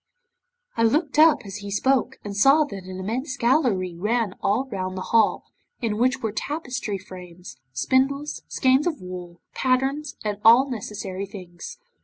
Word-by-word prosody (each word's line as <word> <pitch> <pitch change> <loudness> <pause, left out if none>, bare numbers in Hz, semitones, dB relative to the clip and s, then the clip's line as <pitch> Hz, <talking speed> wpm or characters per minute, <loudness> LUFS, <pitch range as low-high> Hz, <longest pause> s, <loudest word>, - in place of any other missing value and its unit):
'I 230 - +3
looked 295 +5 +1
up 315 0 +6
as 195 0 -6
he 205 -1 -7
spoke, 260 +5 +1
and 205 -1 -6
saw 275 +9 +6
that 200 -10 -8
an 185 0 -7
immense 255 +8 -3
gallery 235 - +1
ran 210 +2 0
all 225 +7 +1
round 185 -2 -3
the 185 - -3
hall, 225 -2 +4 0.4
in 225 -4 -1
which 255 +1 +1
were 220 - 0
tapestry 250 -4 -3
frames, 180 -6 -11
spindles, 265 - 0
skeins 265 +4 +2
of 315 -4 -2
wool, 180 -1 -9
patterns, 270 +3 0
and 210 -1 -2
all 235 +5 +7
necessary 200 -5 -5
things. 190 - -9
225 Hz, 155 wpm, -24 LUFS, 190-265 Hz, 0.4 s, all